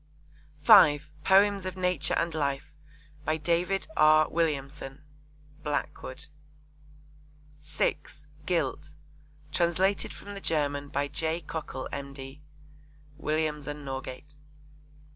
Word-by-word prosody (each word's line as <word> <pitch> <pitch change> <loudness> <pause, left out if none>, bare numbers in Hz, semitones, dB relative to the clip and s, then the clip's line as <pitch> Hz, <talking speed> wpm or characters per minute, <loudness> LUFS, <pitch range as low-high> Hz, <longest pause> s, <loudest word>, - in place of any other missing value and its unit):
(5) 145 +1 +7
Poems 200 0 +5
of 185 0 -5
Nature 180 -5 0
and 165 -1 0
Life. 140 -2 -2 0.5
By 155 +1 0
David 175 +5 0
R. 155 0 +6
Williamson. 140 -4 -2 0.6
(Blackwood.) 145 -1 -4 1.4
(6) 150 0 -2 0.2
Guilt. 150 -3 -1 0.6
Translated 180 +4 +1
from 205 - -9
the 200 - -7
German 145 -4 0
by 140 0 -1
J. 160 +3 -1
Cockle, 150 -4 -5
M.D. 140 0 -7 0.8
(Williams 155 -1 -1
and 145 -1 -6
Norgate.) 135 +2 -6
150 Hz, 95 wpm, -28 LUFS, 145-170 Hz, 1.4 s, 5